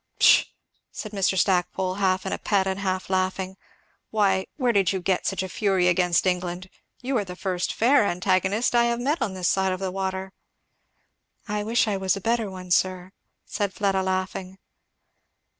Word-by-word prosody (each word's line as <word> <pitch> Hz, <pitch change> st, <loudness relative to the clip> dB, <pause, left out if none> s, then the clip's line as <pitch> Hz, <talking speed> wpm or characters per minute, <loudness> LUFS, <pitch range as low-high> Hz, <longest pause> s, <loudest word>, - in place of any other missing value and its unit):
"Pshaw!" -, -, +6 dB, 0.5 s
said 215 Hz, -, -7 dB
Mr. 195 Hz, -2 st, 0 dB
Stackpole, 185 Hz, 0 st, +1 dB
half 190 Hz, -1 st, 0 dB
in -, -, -2 dB
a -, -, -3 dB
pet 200 Hz, -2 st, +1 dB
and 190 Hz, 0 st, -2 dB
half 185 Hz, -1 st, -2 dB
laughing, 185 Hz, 0 st, -1 dB, 0.5 s
"why, 195 Hz, -3 st, +1 dB
where 250 Hz, -4 st, +2 dB
did 195 Hz, -4 st, +3 dB
you 190 Hz, -, -1 dB
get 185 Hz, 0 st, 0 dB
such 195 Hz, -1 st, -1 dB
a -, -, -4 dB
fury 190 Hz, -1 st, +1 dB
against 180 Hz, -1 st, +2 dB
England? 180 Hz, 0 st, -2 dB, 0.3 s
you 265 Hz, +2 st, -1 dB
are -, -, -1 dB
the 180 Hz, -2 st, -8 dB
first 180 Hz, -1 st, -2 dB
fair 260 Hz, +3 st, +4 dB
antagonist 190 Hz, +6 st, +1 dB
I 235 Hz, 0 st, +4 dB
have 235 Hz, 0 st, 0 dB
met 290 Hz, +7 st, -1 dB
on 190 Hz, -, -1 dB
this 180 Hz, -2 st, -1 dB
side 190 Hz, -1 st, +2 dB
of 185 Hz, -, -5 dB
the 190 Hz, -1 st, -3 dB
water." 190 Hz, 0 st, -4 dB, 1.1 s
"I 210 Hz, -1 st, -2 dB
wish 225 Hz, +2 st, +1 dB
I 205 Hz, -2 st, 0 dB
was 190 Hz, +1 st, 0 dB
a -, -, -4 dB
better 225 Hz, +1 st, 0 dB
one, 185 Hz, -1 st, -9 dB
sir," 185 Hz, +1 st, +1 dB, 0.3 s
said 205 Hz, -2 st, -2 dB
Fleda 195 Hz, -2 st, +1 dB
laughing. 185 Hz, 0 st, -3 dB
190 Hz, 180 wpm, -25 LUFS, 185-205 Hz, 1.1 s, Pshaw